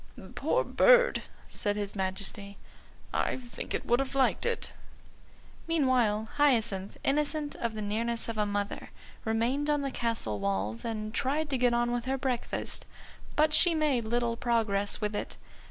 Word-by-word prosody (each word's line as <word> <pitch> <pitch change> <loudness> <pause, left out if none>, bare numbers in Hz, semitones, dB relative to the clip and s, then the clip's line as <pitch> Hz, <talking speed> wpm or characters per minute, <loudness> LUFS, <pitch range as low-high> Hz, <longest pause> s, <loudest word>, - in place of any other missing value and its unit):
"Poor - - +1
bird!" - - +5 0.3
said 205 -1 -2
his 205 -1 -4
Majesty; 200 +1 -3 0.6
"I - - 0
think 245 -2 -6
it - - -3
would 240 +1 +3
have 270 0 -2
liked 270 - +2
it." 470 -1 -2 0.9
Meanwhile 255 -9 +2
Hyacinth, 230 -9 +2
innocent 295 +1 0
of 230 -2 -2
the 215 - -3
nearness 230 +3 -1
of 230 - -3
a 210 -1 +1
mother, 205 0 -3 0.4
remained 240 +7 +1
on 295 -1 +2
the 275 -1 -2
castle 225 - -2
walls 100 +3 -1
and 215 -2 -4
tried 290 +4 0
to 265 - +1
get 245 -1 +3
on 240 0 +1
with 240 -1 -2
her 265 +1 0
breakfast. 255 -3 -2 0.5
But 305 0 +3
she 330 +2 +5
made 290 -7 +1
little 235 +1 0
progress 220 -4 +1
with 210 0 -1
it. - - -4
235 Hz, 155 wpm, -30 LUFS, 210-275 Hz, 0.9 s, bird